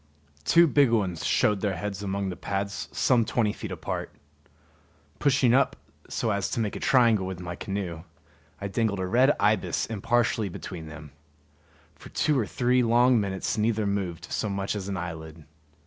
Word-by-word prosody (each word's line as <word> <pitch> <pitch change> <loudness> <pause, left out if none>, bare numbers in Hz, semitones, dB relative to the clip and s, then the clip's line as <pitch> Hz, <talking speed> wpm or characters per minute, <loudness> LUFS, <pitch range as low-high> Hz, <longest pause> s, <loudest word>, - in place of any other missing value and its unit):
Two 170 - +6
big 145 -4 +4
ones 95 -8 0
showed 105 -2 +2
their 100 -3 0
heads 100 +2 -4
among 100 -1 -2
the 90 - -5
pads 100 +1 -4
some 125 -3 +3
twenty 110 -1 0
feet - - -7
apart. - - -4 1.1
Pushing 135 -4 +3
up 135 +2 +3 0.3
so 115 - -1
as 100 -1 -1
to - - -2
make 105 -3 -1
a - - -4
triangle 115 -7 +3
with 95 -2 -5
my 90 -1 -5
canoe, 95 -5 -4 0.6
I 100 - -3
dangled 100 0 -1
a 95 - -1
red 125 +9 +4
ibis 105 +1 +1
impartially 115 -1 0
between 85 -2 -7
them. 80 -2 -10 0.8
For - - -14
two 150 -3 +1
or 110 - -1
three 125 0 +2
long 120 +1 +4
minutes 100 +2 -2
neither 110 0 +1
moved 90 -5 -3
so 110 - -1
much 100 +1 -2
as 100 -2 -4
an 100 -1 -3
eyelid. 80 -3 -7
100 Hz, 170 wpm, -27 LUFS, 95-115 Hz, 1.1 s, Two